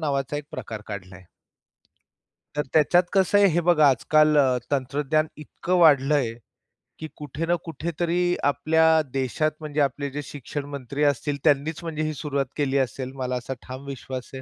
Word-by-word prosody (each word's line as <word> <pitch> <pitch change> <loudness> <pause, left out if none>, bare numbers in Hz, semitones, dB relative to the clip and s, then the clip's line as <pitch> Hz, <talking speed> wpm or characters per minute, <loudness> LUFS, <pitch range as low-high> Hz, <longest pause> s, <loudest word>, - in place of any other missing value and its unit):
नावाचा 140 -2 -1
एक 150 - -5
प्रकार 110 -2 -6
काढलाय. 95 -2 -8 1.3
तर 150 - +1
त्याच्यात 160 +3 +5
कसं 195 +1 +3
आहे 200 - +6
हे 170 +1 +1
बघा, 155 -4 +6
आजकाल 150 +4 +3 0.3
तंत्रज्ञान 145 +3 0
इतकं 170 +4 -3
वाढलं 150 -3 +5
आहे, 120 -6 0 0.7
की 155 - -5
कुठे 150 +2 -5
ना 175 +1 +2
कुठेतरी 170 +3 -1
आपल्या 155 +3 +2 0.3
देशात 135 +3 0
म्हणजे 150 -1 -2
आपले 140 +1 -1
जे 145 +2 -4
शिक्षण 145 +1 -6
मंत्री 140 +2 -3
असतील, 145 0 +1
त्यांनीच 155 +2 +1
म्हणजे 155 -2 -3
ही 155 - -1
सुरुवात 140 -2 -2
केली 140 -2 +1
असेल, 130 0 -2
मला 125 -1 -2
असा 125 +2 -4
ठाम 130 +2 -8
विश्वास 130 -2 -6
आहे. 130 - -6
145 Hz, 160 wpm, -24 LUFS, 135-155 Hz, 1.3 s, आहे